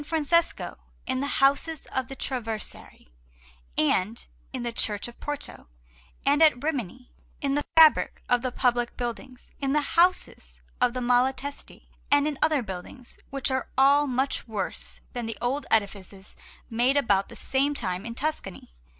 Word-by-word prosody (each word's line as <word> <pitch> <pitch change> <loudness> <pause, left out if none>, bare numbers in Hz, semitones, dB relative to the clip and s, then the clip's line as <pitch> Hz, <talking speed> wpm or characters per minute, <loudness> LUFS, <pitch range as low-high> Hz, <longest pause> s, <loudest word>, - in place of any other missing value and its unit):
Francesco, 325 +2 0 0.3
in 260 -1 -1
the 280 - -1 0.2
houses 280 +3 +2
of 260 -2 -1
the 270 - -8
Traversari, 225 - -5 0.7
and 190 +8 +1 0.3
in 255 -2 -4
the 240 - -2
Church 210 -3 -1
of 240 - -13
Porto; 290 - -6 0.6
and 285 +2 +3
at 300 -5 +5
Rimini, 255 - -3 0.3
in 275 -1 0
the 290 +1 0
fabric 320 -1 +6
of 245 -1 +3
the 255 0 -2
public 240 -1 0
buildings, 245 +1 -6
in 275 -1 0
the 300 - +3
houses 360 +2 +1 0.2
of 250 0 +3
the 255 - -2
Malatesti, 260 +3 -1 0.2
and 285 +1 +4
in 295 -3 -3
other 305 -4 +3
buildings, 195 +5 -9
which 275 -1 -2
are 260 0 -1
all 280 +2 +5
much 260 0 -1
worse 210 -4 -5
than 240 -3 -4
the 225 - -4
old 265 +4 -2
edifices 200 -2 -1 0.3
made 245 +5 +2
about 200 -8 +2
the - - -11
same 280 +2 0
time 185 -7 -3
in 230 0 -6
Tuscany. 255 - -4
255 Hz, 155 wpm, -26 LUFS, 230-285 Hz, 0.7 s, fabric